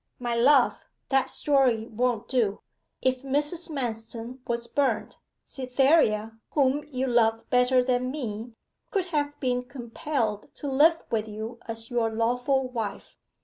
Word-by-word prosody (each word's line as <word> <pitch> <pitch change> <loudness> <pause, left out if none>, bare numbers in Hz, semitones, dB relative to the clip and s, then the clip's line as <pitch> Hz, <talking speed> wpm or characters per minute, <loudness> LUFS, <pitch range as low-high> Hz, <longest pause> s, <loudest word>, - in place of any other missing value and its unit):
'My 240 -1 -2
love, 255 +2 +4 0.3
that 270 -1 +2
story 260 -6 +2
won't 235 0 -1
do. 230 -6 0 0.4
If 255 -1 +1
Mrs. 295 +6 -1
Manston 235 -2 -5
was 235 0 -1
burnt, 255 -4 -1 0.3
Cytherea, 255 -5 +2
whom 285 0 +2
you 265 -3 -2
love 225 -2 +2
better 250 0 +4
than 250 0 0
me, 235 -4 -5 0.4
could 390 -4 0
have 290 -1 -1
been 250 -2 0
compelled 240 -2 -3
to 290 - -6
live 305 +5 +4
with 220 -1 0
you 220 +3 -6
as 225 +1 -5
your 235 -2 +1
lawful 245 +4 +1
wife. 220 -5 -5
250 Hz, 135 wpm, -27 LUFS, 225-270 Hz, 0.4 s, love